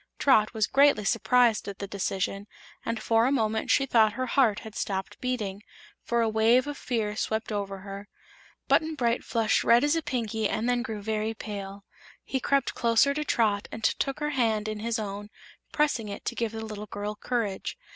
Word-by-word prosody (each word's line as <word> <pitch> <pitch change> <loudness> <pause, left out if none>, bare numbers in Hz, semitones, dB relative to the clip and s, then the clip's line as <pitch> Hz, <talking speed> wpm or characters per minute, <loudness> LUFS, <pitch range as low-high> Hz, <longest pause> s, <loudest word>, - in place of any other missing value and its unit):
Trot 220 -6 +4
was 215 -1 +2
greatly 275 -6 +4
surprised 235 -1 +3
at 200 -1 -6
the 200 - -5
decision 195 0 -3 0.4
and 230 -1 -2
for 225 +2 +2
a - - +1
moment 220 -4 0
she 270 - +4
thought 220 -5 +4
her 255 +4 -2
heart 245 -5 +2
had 220 -2 -10
stopped 190 -2 -4
beating, 215 -6 -3 0.4
for 235 0 0
a - - +1
wave 225 +3 +3
of 290 0 -4
fear 220 -6 -2
swept 220 +1 -2
over 195 -2 -3
her. 200 +1 -8 0.6
Button 315 0 +2
Bright 240 -3 0
flushed 225 -2 +1
red 235 +2 +5
as 295 +2 +3
a 330 - 0
Pinky 225 -7 -2
and 220 +2 -1
then 245 0 +1
grew 220 -3 -5
very 220 +1 -2
pale. 200 -2 -7 0.4
He 265 - -2
crept 275 0 +1
closer 235 +4 +3
to 300 +1 -2
Trot 210 -7 +1
and 225 - -7
took 275 +5 0
her 295 0 0
hand 225 -6 +1
in 215 -1 -4
his 230 +2 -1
own, 205 -1 -5 0.4
pressing 285 -8 0
it 200 - -7
to - - -1
give 230 -2 -1
the 220 0 -6
little 210 -1 -7
girl 205 +1 -4
courage. 215 -4 -3
220 Hz, 195 wpm, -27 LUFS, 210-245 Hz, 0.6 s, red